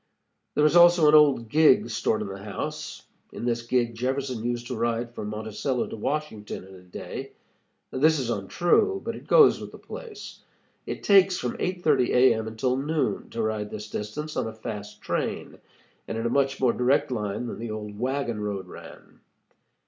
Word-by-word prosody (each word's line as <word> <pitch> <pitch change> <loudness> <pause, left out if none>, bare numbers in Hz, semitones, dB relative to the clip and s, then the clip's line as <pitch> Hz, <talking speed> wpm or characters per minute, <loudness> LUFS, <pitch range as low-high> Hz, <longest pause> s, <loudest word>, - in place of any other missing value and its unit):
There 150 - +4
is 155 - +3
also 175 -2 +7
an 150 - +6
old 145 -6 +5
gig 150 0 +5
stored 110 0 0
in - - -6
the 95 0 -7
house. 105 - -5 0.3
In - - -6
this 120 -1 0
gig 120 0 0
Jefferson 130 0 -2
used 120 0 -2
to 125 - -4
ride 115 +1 -1
from 105 - -5
Monticello 110 +4 -2
to - - -7
Washington 115 -4 -4
in 95 +1 -14
a 95 - -13
day. 90 -1 -8 0.6
This 155 +4 +3
is 125 -4 -2
untrue, 175 - +1
but - - -3
it - - -12
goes 460 -4 +6
with - - -8
the - - -11
place. 435 -4 -9 0.5
It - - -5
takes 195 -2 +5
from 125 - -3
8:30 155 -9 +1
A. 125 0 +6
M. 110 0 -3
until 125 +4 -1
noon 150 +3 -1
to 115 - -3
ride 110 -1 -2
this 105 0 -8
distance 150 +9 -5
on - - -1
a 110 - -6
fast 105 -2 -8
train, - - -3 0.5
and 115 - -4
in 115 - -3
a - - +2
much 135 0 +1
more 125 -3 +3
direct 130 +2 +2
line 105 -1 -2
than 115 - -6
the 115 0 -5
old 105 -1 -6
wagon 125 -3 -1
road 100 -2 -3
ran. - - -13
120 Hz, 185 wpm, -26 LUFS, 110-145 Hz, 0.6 s, also